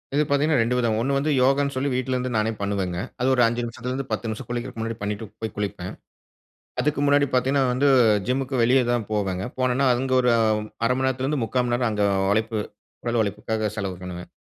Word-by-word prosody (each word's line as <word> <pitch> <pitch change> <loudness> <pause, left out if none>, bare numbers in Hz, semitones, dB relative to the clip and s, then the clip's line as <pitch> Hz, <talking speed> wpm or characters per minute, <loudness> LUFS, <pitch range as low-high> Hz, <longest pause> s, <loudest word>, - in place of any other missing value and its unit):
இது 150 - +4
பாத்தீங்கன்னா 140 -2 +3
2 125 +2 +1
விதம். 115 -3 +1
1 140 +4 0
வந்து 150 +2 0
யோகான்னு 140 +2 +2
சொல்லி 135 +2 0
வீட்லருந்து 130 0 -1
நானே 110 +1 +1
பண்ணுவேங்க. 95 -3 -1 0.2
அது 125 - +2
ஒரு 125 - +3
5 120 +1 -2
நிமிஷத்துலருந்து, 125 +3 -4
10 115 - -2
நிமிஷம் 110 +2 -5
குளிக்கறதுக்கு 120 -1 -4
முன்னாடி 115 0 -3
பண்ணிட்டு 105 +2 -3 0.2
போய் 110 -2 -4
குளிப்பேன். 100 -3 -4 0.9
அதுக்கு 150 -1 0
முன்னாடி 145 0 +4
பாத்தீங்கன்னா 135 +2 +2
வந்து, 140 +3 +2 0.4
ஜிம்முக்கு 130 -1 0
வெளிய 125 +2 +4
தான் 120 -4 -1
போவேங்க 95 -2 -1
போனன்னா, 130 +1 +2
அங்க 130 +1 -1
ஒரு 125 - +2 0.6
1/2 - - +1
மண்நேரத்துலருந்து, 130 +2 0
1/4 125 +2 0
மணிநேரம் 120 0 +1
அங்க 105 -1 +1 0.3
உழைப்பு 110 0 0 0.5
உடல் 120 -1 +1
உழைப்புக்காக 105 +1 -2
செலவு 95 -3 -3
பண்ணுவேன். 90 -1 -7
120 Hz, 180 wpm, -24 LUFS, 110-130 Hz, 0.9 s, இது